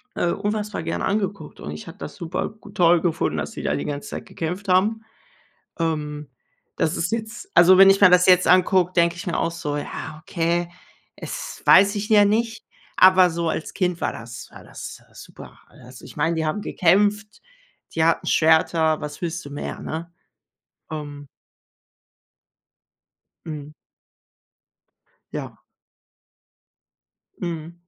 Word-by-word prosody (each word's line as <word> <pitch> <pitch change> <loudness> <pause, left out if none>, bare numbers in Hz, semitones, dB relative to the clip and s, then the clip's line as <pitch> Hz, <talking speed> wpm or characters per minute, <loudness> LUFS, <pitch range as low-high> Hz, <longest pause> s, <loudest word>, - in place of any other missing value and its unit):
äh, 175 - 0
unfassbar 210 0 -2
gern 165 - -3
angeguckt 200 -6 -3
und 75 - -7
ich 75 0 -9
habe - - -10
das - - -8
super 170 +1 -4
g - - -12
toll 175 -1 +4
gefunden, 170 -2 -1
dass - - -3
die - - -8
da - - 0
die - - -4
ganze 145 -1 -5
Zeit - - -7
gekämpft 180 +5 -5
haben. 200 +5 +2 0.8
Ähm, 150 -3 -3 0.5
das 155 - 0
ist 175 +5 -2
jetzt 225 - -5
also, 185 +2 +7
wenn 195 0 +9
ich 195 - +4
mir 200 -3 +8
das 180 0 +5
jetzt 180 0 +5
angucke, 185 0 +4
denke 170 -1 +2
ich 170 - -8
mir 170 - -1
auch 170 - 0
so: 150 -3 -4
„Ja, 155 +1 -6
okay, 170 0 -1 0.5
es - - -7
weiß 200 +2 +6
ich 205 +1 -3
ja 210 -1 +6
nicht”, 225 +2 -1 0.3
aber 185 -1 +6
so 170 0 -2
als 160 - -4
Kind 180 -2 -1
war - - -1
das 115 0 -9
war - - -13
das, - - -9
äh, - - -26
super. - - -13
Also, 125 +1 -14
ich - - -13
meine, 165 +3 0
die 160 -1 -1
haben 155 +7 -2
gekämpft, 205 +4 +1 0.5
die 160 - +2
hatten 165 - +1
Schwerter. 160 0 +3
Was 150 0 -7
willst 175 +1 -3
du - - -8
mehr, 145 - -6
ne? 165 +2 -6 0.8
Ähm 145 -2 -7 2.2
Mhm. 150 -2 -7 1.6
Ja. - - -6 1.8
Mhm. 165 -1 -5
170 Hz, 155 wpm, -22 LUFS, 160-195 Hz, 2.2 s, wenn